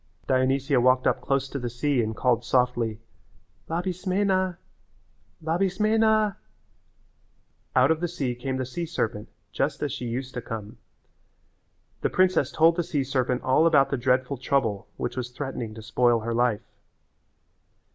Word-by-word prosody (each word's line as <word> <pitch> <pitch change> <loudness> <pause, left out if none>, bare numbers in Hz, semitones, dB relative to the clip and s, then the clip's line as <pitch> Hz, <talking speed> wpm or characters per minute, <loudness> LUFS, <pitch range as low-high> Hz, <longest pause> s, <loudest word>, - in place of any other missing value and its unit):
Dionysia 130 0 +2
walked 130 +1 +3
up - - +2
close 135 -1 0
to 140 - -4
the 120 -1 -3
sea 125 +2 0
and 110 0 -2
called 120 -1 +1
softly, 120 -3 +1 0.7
"Labismena, 185 +1 0 0.9
Labismena." 210 +5 +2 1.4
Out - - +5
of 160 - +1
the 175 - -1
sea 140 -7 -2
came 130 +2 -4
the 130 - -2
sea 170 +7 -4
serpent 110 -9 -3 0.2
just 145 +3 -1
as 145 - -1
she 130 -2 -5
used 125 +3 -4
to 125 - -4
come. 110 -2 -7 1.2
The - - +1
princess 185 -7 +2
told 165 +2 +4
the 175 - +1
sea 150 -4 -1
serpent 130 -2 -1
all 140 +6 +4
about 140 -4 +4
the - - +2
dreadful 130 +2 +1
trouble 120 -6 0
which 120 - -3
was 125 -1 -3
threatening 125 -4 -5
to 110 - -9
spoil 120 0 +2
her 115 +1 -3
life. 120 -3 +1
130 Hz, 145 wpm, -26 LUFS, 120-165 Hz, 1.4 s, Out